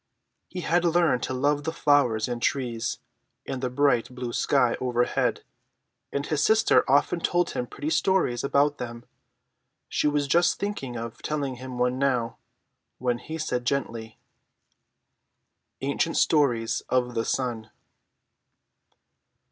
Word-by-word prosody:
He 180 - -6
had 170 +2 +1
learned 170 -6 +2
to - - -3
love 145 +3 +1
the 160 - -2
flowers 140 -9 +2
and 120 -1 -4
trees, 120 -4 -1 0.5
and 130 - -4
the 130 - -1
bright 125 -2 +2
blue 125 -1 -6
sky 125 -4 +2
overhead, 120 -1 0 0.7
and 140 0 -2
his 150 -2 0
sister 220 0 +4
often 145 +5 +3
told 175 +1 +1
him 125 - -3
pretty 150 +5 -4
stories 160 -8 +1
about 140 +1 +2
them. 120 -1 -7 0.8
She - - +1
was 145 -1 +1
just 170 +5 +3
thinking 200 -12 -4
of 115 0 -7
telling 140 -4 -2
him 130 0 -7
one 125 +1 0
now, 125 -4 0 0.6
when 125 -1 -1
he 160 +5 -6
said 150 -6 -2
gently: 115 -4 -3 1.6
ANCIENT 140 +4 0
STORIES 120 -7 +2
OF 125 -1 +1
THE 115 -1 0
SUN. 115 -3 -2
130 Hz, 130 wpm, -26 LUFS, 120-150 Hz, 1.6 s, sister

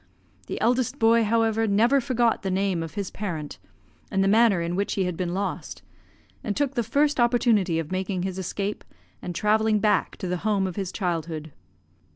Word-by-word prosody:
The - - -4
eldest 245 +1 +1
boy, 230 +1 +4
however, 225 0 +1
never 235 +7 +3
forgot 240 -2 +1
the 195 - -2
name 190 -2 0
of 165 -2 -7
his 200 -2 -3
parent, 165 -8 -5 0.5
and 195 0 +1
the - - +2
manner 215 -2 +4
in 170 +1 -2
which 200 +2 -1
he 195 - 0
had 180 -1 -2
been 175 0 -3
lost, 200 +1 -4 0.6
and 205 - -2
took 285 -2 0
the 240 - 0
first 285 +5 +1
opportunity 235 -7 +3
of 165 0 -4
making 185 -1 -2
his 190 0 -3
escape, 200 +3 -3 0.4
and 175 - -6
travelling 215 +2 +2
back 210 0 +1
to 190 - -5
the 180 0 -1
home 200 0 0
of 185 -2 -4
his 195 -3 -3
childhood. 165 -4 -3
200 Hz, 190 wpm, -25 LUFS, 180-225 Hz, 0.6 s, boy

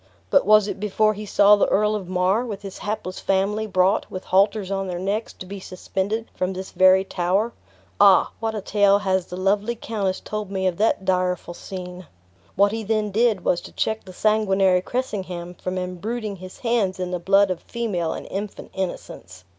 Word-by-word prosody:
"But - - +4
was 215 -1 +6
it 205 - -4
before 215 +1 +2
he 210 0 -8
saw 205 +1 +6
the 205 - +2
Earl 210 +1 +2
of 195 -4 -4
Mar, 185 +5 +2
with 210 -5 -6
his 195 -1 -8
hapless 205 -3 -4
family, 200 +3 0
brought, 190 +1 +2
with 185 - -6
halters 200 +1 +2
on 195 -1 -1
their 180 -1 -3
necks, 200 +5 -2
to - - -10
be 200 +2 -7
suspended 190 +4 -3
from 185 +1 -2
this 190 +1 -7
very 185 0 +5
tower? 195 +5 0 0.5
Ah! 195 -2 +6
what 225 0 -2
a 210 - -3
tale 200 0 +3
has 190 -3 0
the 180 - -7
lovely 200 +5 +1
countess 200 -5 -2
told 210 -2 -5
me 190 -1 -2
of 180 -2 0
that 210 -2 +1
direful 180 -2 0
scene! 180 -1 -8 0.5
What 200 +1 +4
he 225 0 -3
then 215 -1 0
did 215 -3 +2
was 175 - +2
to - - -11
check 220 0 -1
the 185 - -10
sanguinary 195 -2 +2
Cressingham 185 -7 -4
from 185 +1 -5
imbruiting 200 +4 -4
his 185 +1 -10
hands 230 -6 0
in 180 -1 -3
the 180 - -2
blood 195 +2 +4
of 175 - -4
female 190 -9 -2
and - - -7
infant 200 +1 -6
innocence." 95 - -6
195 Hz, 195 wpm, -23 LUFS, 185-210 Hz, 0.5 s, was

